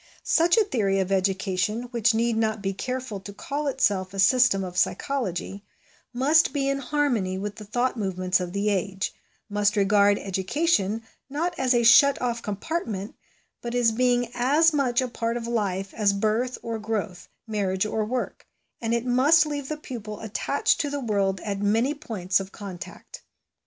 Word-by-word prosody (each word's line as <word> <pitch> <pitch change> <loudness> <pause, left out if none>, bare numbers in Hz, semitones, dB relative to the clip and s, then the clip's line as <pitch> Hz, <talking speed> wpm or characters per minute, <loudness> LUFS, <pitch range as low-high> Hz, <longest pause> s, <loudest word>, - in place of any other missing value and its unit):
Such 340 +5 +3
a 445 - +6
theory 205 - 0
of 190 0 -1
education, 195 +3 0
which 230 -1 +2
need 230 0 +1
not 220 -1 0
be 195 -1 -2
careful 250 0 -4
to 200 +1 -9
call 285 +8 -4
itself 200 -8 0
a - - -5
system 220 -1 +4
of 180 -1 -6
psychology, 200 -3 -2 0.5
must 290 +6 +3
be 275 -2 0
in 275 0 0
harmony 250 -9 0
with 205 +1 -5
the 215 - -9
thought 245 +5 0
movements 185 -3 0
of 180 -1 -4
the 200 +2 0
age; 195 0 -2 0.3
must 205 0 +1
regard 200 0 +4
education, 205 - 0 0.3
not 330 +6 -1
as 255 -1 +2
a 235 - +3
shut 280 +4 +6
off 240 -2 -2
compartment, 210 - -4 0.5
but 240 0 -4
as 240 -2 +3
being 245 0 +1
as 295 +6 +3
much 260 -4 +2
a 255 - -1
part 230 -1 -2
of 235 - -5
life 200 -5 -2
as 205 -2 +2
birth 220 +5 0
or 230 -1 -3
growth, 210 -5 -4 0.2
marriage 200 -3 -1
or 215 0 -1
work; 245 +4 -4 0.3
and 230 0 0
it 235 +1 -2
must 275 +6 +5
leave 285 -3 -4
the 305 - -3
pupil 225 -8 -7
attached 225 +9 0
to 290 - -2
the 285 0 -3
world 200 -6 0
at 200 -2 -3
many 225 +7 +1
points 200 -11 -1
of 195 0 -7
contact. 195 -4 -9
225 Hz, 170 wpm, -25 LUFS, 195-255 Hz, 0.5 s, a